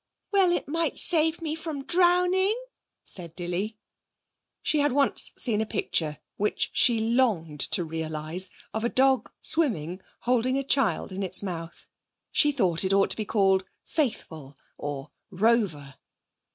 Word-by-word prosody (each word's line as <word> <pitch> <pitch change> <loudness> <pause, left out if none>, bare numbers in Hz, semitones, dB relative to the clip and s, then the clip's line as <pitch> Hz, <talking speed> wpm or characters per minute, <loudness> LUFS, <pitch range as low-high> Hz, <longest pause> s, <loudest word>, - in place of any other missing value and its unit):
'Well, 390 -3 +3
it 345 - -1
might 330 +3 -1
save 325 0 +3
me 310 -1 -2
from 315 -3 -6
drowning,' 360 - +3 0.5
said 170 -3 -3
Dilly. 185 +5 -4 0.9
She 305 - +1
had 290 -2 +1
once 280 0 +3
seen 220 -4 0
a - - -1
picture, 155 -6 -2 0.2
which 210 +1 -1
she 235 -3 +3
longed 220 - 0
to 175 +6 +2
realise, 160 +2 -3 0.2
of 220 - -3
a 235 - +1
dog 265 -2 +2
swimming, 190 - -1 0.2
holding 250 +2 +1
a 275 - -1
child 270 -6 +1
in 190 +1 -5
its 185 0 +5
mouth. 170 -3 -6 0.5
She 295 - +4
thought 190 - +2
it 190 +1 0
ought 195 0 +3
to - - +3
be 215 - -4
called 195 -3 +2 0.2
Faithful 160 - -3 0.2
or 145 -2 -6 0.2
Rover. 190 - 0
220 Hz, 145 wpm, -26 LUFS, 175-285 Hz, 0.9 s, its